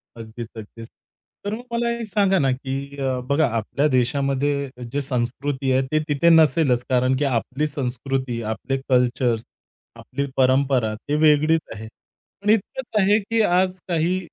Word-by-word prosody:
अगदीच-अगदीच. 115 0 -9 0.6
तर 205 - -2
मग 235 +3 -5
मला 235 0 0
एक 225 - -5
सांगा 195 -2 +2
ना, 135 -3 +2
की 135 +2 -5
अ, 130 -2 -1
बघा 145 +1 +3
आपल्या 140 +7 0
देशामध्ये 140 +2 0 0.2
जे 145 - -1
संस्कृती 130 +1 -2
आहे 130 +1 +3
ते 155 - +3
तिथे 145 +3 +3
नसेलच 155 -6 +4
कारण 130 0 +2
की 145 - 0
आपली 135 +3 -1
संस्कृती, 130 -3 -3
आपले 110 +5 -3
कल्चर्स, 125 -2 +2 0.5
आपली 140 +2 -4
परंपरा 130 -3 +2
ती 145 +7 -4
वेगळीच 155 +2 +4
आहे. 110 +1 -8 0.5
पण 205 - -2
इतकंच 220 +1 0
आहे 205 +3 +4
की 225 +3 0
आज 185 -2 +3 0.2
काही 175 +2 +1
140 Hz, 145 wpm, -22 LUFS, 125-160 Hz, 0.6 s, नसेलच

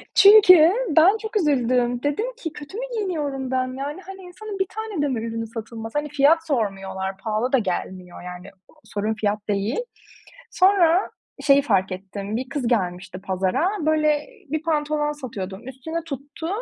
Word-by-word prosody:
Çünkü 365 -5 +8 0.3
ben 370 +7 +7
çok 440 0 -3
üzüldüm. 250 - +1
Dedim 290 +10 0
ki: 325 -10 -6
"Kötü 295 +7 -9
mü - - -3
giyiniyorum 295 - -2
ben?" 255 0 -1
Yani, 290 +6 -5
hani, 385 0 -10
insanın 390 +3 -8
1 385 - +2
tane 440 -6 -4
de 290 - +1
mi 255 -4 -1
ürünü 225 0 -4
satılmaz? 225 0 -7
Hani, 295 0 -1
fiyat 295 +3 +3
sormuyorlar, 195 -7 -2
pahalı 220 +4 -2
da 270 - +5
gelmiyor, 185 -3 -4
yani. 180 +1 -9 0.3
Sorun 210 +2 -2
fiyat 215 -1 -1
değil. 205 - 0 0.7
Sonra 370 -1 +4 0.3
şeyi 280 0 +5
fark 195 -8 +1
ettim, 195 +2 -5
bir 255 +1 -5
kız 275 -3 -2
gelmişti 185 -4 -2
pazara, 190 - 0 0.2
böyle, 305 0 +2 0.2
bir 315 0 -1
pantolon 300 -2 0
satıyordum. 220 -7 -7
Üstüne 320 +6 -5
tuttu 290 +2 -7
270 Hz, 155 wpm, -23 LUFS, 215-320 Hz, 0.7 s, Çünkü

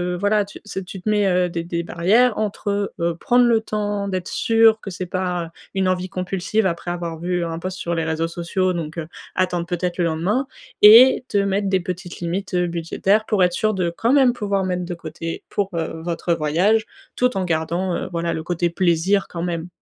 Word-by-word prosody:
heu, - - -4
voilà 205 +2 +2
tu 200 - -12
c'est 190 -3 -6
tu 190 0 -9
te 215 - -2
mets, 210 -1 +2
heu, 180 -1 +2
des 170 -1 -4
des 170 0 -2
barrières 210 +8 +2
entre, 210 -1 -2 0.3
heu, - - -2
heu, 170 -1 0
prendre 245 +6 +3
le 230 -1 +4
temps 205 -2 -2
d'être 185 -2 -3
sûr 225 -1 +4
que 200 - -7
c'est 180 0 -5
pas 180 -2 -2 0.2
une 190 -1 +1
envie 185 0 -1
compulsive, 190 +3 -1
après 175 -1 -2
avoir 170 -2 -4
vu 175 +1 -1
un 165 -1 -4
post 185 +1 -5
sur 170 -1 -2
les 165 -1 -1
réseaux 160 +1 -1
sociaux 175 +2 -1
donc, 165 -2 -5
heu, 160 -2 -4 0.3
attendre 180 -2 0
peut-être 175 0 -2
le 175 - +1
lendemain 165 +5 0 0.5
et 240 +5 +9
te 205 - 0
mettre 200 0 0
des 190 -1 +2
petites 180 0 -6
limites, 180 +3 -3
heu, 180 -1 +2
budgétaires, 175 +5 0
pour 210 -4 +2
être 180 -1 +2
sûr 215 +4 +1
de, 180 -3 0
quand 225 +9 0
même, 265 -4 +5
pouvoir 200 -4 -1
mettre 180 -1 -2
de 175 - -4
côté 165 0 -6
pour, 200 -2 -1
heu, 160 -1 -3
votre 170 0 -1
voyage 175 +9 +2 0.3
tout 250 0 +1
en 190 - 0
gardant, 170 +2 -1
heu, - - -3
voilà 170 0 -1
le 160 - -4
côté 175 0 0
plaisir 180 +3 +2
quand 170 - -6
même. 170 -1 -3
180 Hz, 220 wpm, -21 LUFS, 170-200 Hz, 0.5 s, et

